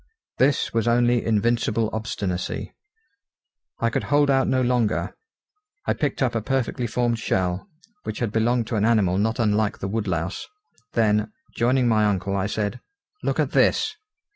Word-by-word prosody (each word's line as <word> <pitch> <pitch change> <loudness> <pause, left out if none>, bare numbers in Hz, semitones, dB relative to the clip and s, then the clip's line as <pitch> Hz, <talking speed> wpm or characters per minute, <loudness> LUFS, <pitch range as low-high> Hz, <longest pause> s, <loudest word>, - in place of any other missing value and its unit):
This 135 0 +2
was 115 0 +1
only 120 0 +3
invincible 115 0 +1
obstinacy. 100 -4 -3 1.1
I 115 0 +1
could - - -1
hold 145 -1 +3
out 135 -1 +3
no 130 -1 +2
longer. 120 -3 0 0.7
I - - +2
picked 145 -2 -1
up 125 - +1
a 115 - -1
perfectly 125 0 -1
formed 120 +1 0
shell, 95 - -1 0.3
which 110 - -5
had 115 -4 -1
belonged 115 +2 +1
to 115 - -1
an 100 - +1
animal 105 -5 +3
not 110 +2 0
unlike 110 -2 +1
the 95 - -4
woodlouse: 95 -4 -2 0.5
then, 105 - +2 0.2
joining 125 +1 +2
my 110 -2 +3
uncle, 100 -1 0
I 95 0 0
said: 105 +3 -2 0.4
"Look - - -1
at - - +1
this!" 435 -1 +2
115 Hz, 155 wpm, -24 LUFS, 105-120 Hz, 1.1 s, only